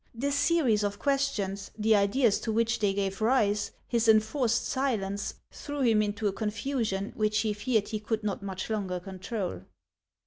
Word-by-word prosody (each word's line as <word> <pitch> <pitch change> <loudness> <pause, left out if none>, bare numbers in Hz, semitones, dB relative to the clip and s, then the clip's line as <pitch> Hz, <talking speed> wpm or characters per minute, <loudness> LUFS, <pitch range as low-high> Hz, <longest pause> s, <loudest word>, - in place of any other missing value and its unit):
This 280 +5 -1
series 280 -7 +3
of 205 0 -1
questions, 210 -9 -1
the 220 0 +4
ideas 205 +3 +3
to 225 - -3
which 230 +1 +1
they 205 -2 +2
gave 195 0 -2
rise, 210 -3 +2 0.2
his 235 -1 +1
enforced 225 +2 +3
silence, 205 -7 -1 0.2
threw 290 -1 -5
him 225 -4 +4
into 210 +1 -2
a 195 - 0
confusion 215 -1 -2
which 215 -1 +1
he 215 -2 0
feared 210 0 0
he 215 -1 -2
could 215 +1 -2
not 200 -2 -2
much 190 -2 -5
longer 190 -4 -2
control. 185 - -5
215 Hz, 165 wpm, -29 LUFS, 200-235 Hz, 0.2 s, the